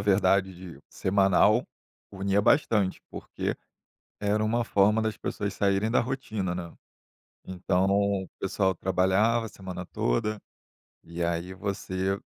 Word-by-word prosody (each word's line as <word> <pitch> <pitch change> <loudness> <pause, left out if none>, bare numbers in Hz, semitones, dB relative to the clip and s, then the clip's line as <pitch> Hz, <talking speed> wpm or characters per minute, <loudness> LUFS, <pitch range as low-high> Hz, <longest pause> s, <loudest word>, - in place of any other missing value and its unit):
verdade, 100 -1 +2
de 90 -1 -10
de 70 - -17
semanal, 100 +4 +3 0.5
unia 100 +1 0
bastante, 105 -8 +2
porque - - -4 0.6
era 105 +1 +1
uma 115 +2 +1
forma 105 +1 +3
das 110 -1 -2
pessoas 100 -1 -3
saírem 100 +2 +1
da 120 - +3
rotina, 110 -7 -3
né. 85 -2 -6 0.7
Então 95 0 0
o 100 -1 +1
pessoal 95 -1 0
trabalhava 95 +6 +2
a - - -7
semana 90 -2 -7
toda 105 - -1 0.6
e 85 +1 -5
aí 85 +2 -2
você 95 0 -2
100 Hz, 125 wpm, -27 LUFS, 95-105 Hz, 0.7 s, semanal